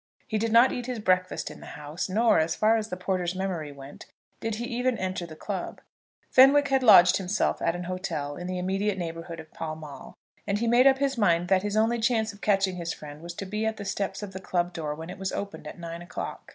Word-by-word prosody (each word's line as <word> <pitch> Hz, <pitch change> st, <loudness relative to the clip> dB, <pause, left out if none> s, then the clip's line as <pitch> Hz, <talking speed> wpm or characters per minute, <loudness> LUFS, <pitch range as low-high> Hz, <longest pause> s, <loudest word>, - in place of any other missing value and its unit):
He 220 Hz, -, -1 dB
did 225 Hz, +1 st, -1 dB
not 235 Hz, +3 st, +6 dB
eat 245 Hz, -1 st, -4 dB
his 250 Hz, -2 st, -3 dB
breakfast 185 Hz, -3 st, 0 dB
in -, -, -11 dB
the -, -, -11 dB
house, 150 Hz, +5 st, -5 dB
nor, 220 Hz, 0 st, +4 dB
as 160 Hz, +1 st, 0 dB
far 220 Hz, +1 st, +3 dB
as 220 Hz, -1 st, -1 dB
the 180 Hz, -, -4 dB
porter's 185 Hz, -1 st, -1 dB
memory 180 Hz, -6 st, -3 dB
went, 140 Hz, 0 st, -11 dB, 0.3 s
did 225 Hz, -1 st, -2 dB
he 235 Hz, +2 st, -4 dB
even 245 Hz, 0 st, 0 dB
enter 185 Hz, -2 st, -3 dB
the 155 Hz, -, -10 dB
club. -, -, -5 dB, 0.5 s
Fenwick 285 Hz, +2 st, +6 dB
had 270 Hz, -1 st, +3 dB
lodged 190 Hz, -6 st, +8 dB
himself 190 Hz, +2 st, -1 dB
at 165 Hz, -, +1 dB
an 175 Hz, -, -4 dB
hotel 170 Hz, -5 st, -4 dB
in 175 Hz, +3 st, -6 dB
the 185 Hz, 0 st, -3 dB
immediate 195 Hz, +2 st, -1 dB
neighbourhood 165 Hz, -1 st, -5 dB
of 160 Hz, -, -12 dB
Pall 160 Hz, -1 st, -4 dB
Mall, 155 Hz, -3 st, -11 dB, 0.3 s
and 200 Hz, 0 st, +1 dB
he 230 Hz, -, -1 dB
made 240 Hz, +3 st, +5 dB
up 265 Hz, -1 st, +5 dB
his 275 Hz, -2 st, 0 dB
mind 175 Hz, -4 st, +2 dB
that 190 Hz, -1 st, +4 dB
his 205 Hz, +1 st, -2 dB
only 230 Hz, +2 st, +2 dB
chance 225 Hz, -2 st, +1 dB
of 200 Hz, -, -17 dB
catching 195 Hz, -3 st, +2 dB
his 170 Hz, -1 st, -3 dB
friend 150 Hz, 0 st, -9 dB
was 170 Hz, 0 st, -8 dB
to 195 Hz, -, -5 dB
be 210 Hz, +3 st, -3 dB
at 220 Hz, 0 st, -1 dB
the 205 Hz, -, -6 dB
steps 195 Hz, 0 st, -3 dB
of 200 Hz, -1 st, -7 dB
the 190 Hz, -, -7 dB
club 175 Hz, -1 st, -1 dB
door 150 Hz, -2 st, -3 dB
when 160 Hz, +3 st, -8 dB
it -, -, -10 dB
was 190 Hz, 0 st, -2 dB
opened 200 Hz, 0 st, -5 dB
at -, -, -8 dB
nine 170 Hz, 0 st, -7 dB
o'clock. 175 Hz, -, -7 dB
190 Hz, 245 wpm, -27 LUFS, 170-220 Hz, 0.5 s, lodged